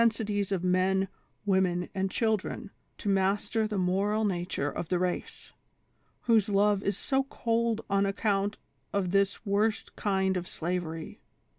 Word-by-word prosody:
225 225 -1 +3 0.2
sities - - -11
of 185 -3 0
men, 185 +1 +2 0.4
women 185 -3 +2
and 195 -1 0
children 220 -1 -1 0.3
to - - -7
master 200 +3 +2
the 210 -1 -3
moral 195 +4 +1
na 180 -4 0
ture 145 - -1
of 175 - -5
the 180 - +2
race, 180 0 -3 0.7
whose 220 -4 +3
love 205 0 +3
is 200 -1 -1
so 270 0 +1
cold 230 -3 0
on 200 0 +2
accomit 200 0 0 0.3
of 190 -3 0
this 200 +2 +1
worst 210 +2 0
kind 190 -2 +1
of 175 0 -4
slavery 165 -1 -4
195 Hz, 150 wpm, -29 LUFS, 185-210 Hz, 0.7 s, 225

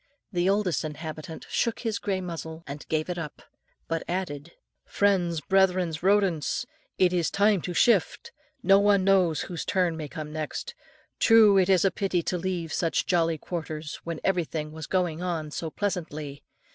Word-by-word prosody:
The 180 -1 +1
oldest 200 -4 +1
inhabitant 155 +1 -7
shook 230 -2 -1
his 225 -4 -2
grey 190 -2 -1
muzzle, 165 -2 -6
and 145 +1 -8
gave 155 0 0
it 175 -1 -3
up; 150 -3 -7 0.4
but 165 0 -1
added, 170 -4 -4 0.3
"Friends, 180 -5 +1
brethren, 185 -1 +2
rodents! 190 -5 +2 0.3
it 180 -1 +3
is 175 -3 +1
time 205 -2 +3
to 180 - -4
shift. 245 - +2 0.3
No 195 0 +6
one 200 -1 +4
knows 185 -5 +3
whose 175 -3 -5
turn 180 -4 +1
may 155 -2 -5
come 150 +1 -7
next. 155 - -4 0.5
True, 225 -3 +7
it 185 0 +2
is 190 -1 +4
a 195 - +4
pity 190 -4 -1
to 180 - -1
leave 175 -2 -3
such 165 -2 0
jolly 165 -3 +2
quarters, 155 -2 -5
when 170 -2 -4
everything 165 -5 -1
was 155 -1 -7
going 175 -3 0
on 165 -4 -3
so 160 +1 -4
pleasantly. 155 -6 -4
175 Hz, 165 wpm, -27 LUFS, 160-190 Hz, 0.5 s, True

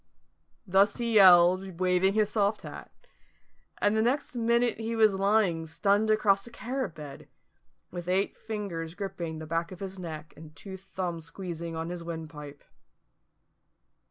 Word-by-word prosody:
Thus 195 +1 +3
he 235 -2 -2
yelled, 185 -2 +6
waving 185 +2 +2
his 215 -1 +2
soft 210 0 +1
hat: - - -9 0.9
and 205 +1 +2
the 220 - +3
next 255 +3 0
minute 235 0 +1 0.2
was 215 -2 +5
lying 195 -4 +1
stunned 200 +6 +1
across 210 -1 +3
a - - -9
carrot 245 - -4
bed, 145 -3 -10 0.6
with 175 0 -6
eight 190 +2 +1
fingers 190 -7 -5
gripping 175 -5 -5
the 160 - -7
back 165 +2 -2
of 185 - -9
his 195 -1 -6
neck 155 -3 -7
and 155 0 -13
two 190 +6 -9
thumbs 180 -3 -5
squeezing 170 -1 -6
on 160 +1 -4
his 175 -1 -5
windpipe. 155 -3 -8
190 Hz, 145 wpm, -28 LUFS, 165-210 Hz, 0.9 s, yelled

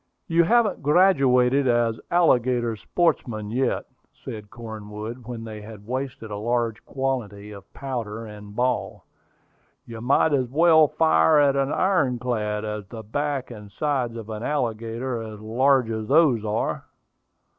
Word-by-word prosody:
"You 170 0 +3
haven't 235 +2 +2
graduated 140 -5 +4
as 120 -2 +1
alligator 125 -8 +2
sportsmen 110 -6 -1
yet," 130 +3 0 0.4
said 105 -2 -7
Cornwood 110 +1 -8
when 120 -2 -6
they 110 -2 -8
had 105 -1 -11
wasted 130 -2 -5
a 105 - -4
large 115 0 -1
quantity 110 -7 -3
of 100 -2 -12
powder 115 -5 -5
and 105 -1 -11
ball. 125 +1 -1 0.8
"You 115 -1 -9
might 140 +5 +3
as 130 -3 +1
well 160 +2 +5
fire 80 - +3
at 140 -1 +4
an 135 +1 0
iron 155 -11 +1
clad, 110 -4 -2
as 105 -1 -4
at - - -33
the 115 -1 -8
back 140 +4 -3
and 105 -3 -10
sides 125 0 -1
of 115 -1 -7
an 110 0 -5
alligator 115 -2 -2
as 110 -1 -8
large 125 +2 +2
as 110 -1 -4
those 140 -6 +4
are." 105 0 -2
120 Hz, 145 wpm, -24 LUFS, 110-135 Hz, 0.8 s, well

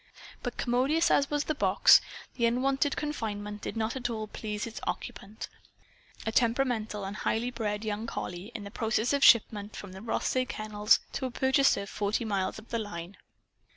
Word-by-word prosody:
But 245 - -4
commodious 265 +7 +2
as 280 - +3
was 295 0 0
the 310 - -1
box, 300 - +6 0.3
the 235 -2 +2
unwonted 270 +4 +1
confinement 210 -8 -4
did - - -5
not 225 +2 -1
at 245 -2 -2
all 220 -2 -3
please 210 0 -5
its 230 -1 -7
occupant 210 +2 -5 0.8
a 220 - 0
temperamental 230 -3 +1
and 195 +2 -5
highly 235 +3 -1
bred 215 -3 -3
young 215 +1 -3
collie 180 0 -5
in 210 -3 -5
process 225 +2 0
of 280 0 +1
shipment 210 -2 +5
from 200 - -8
the 190 +1 -9
Rothsay 255 +3 0
Kennels 215 -1 +2
to 260 - -2
a - - -5
purchaser 265 -3 +3
forty 205 +3 -1
miles 195 -3 -1
up 220 +1 -13
the 230 - -1
line. 185 -3 -6
225 Hz, 170 wpm, -29 LUFS, 210-250 Hz, 0.8 s, box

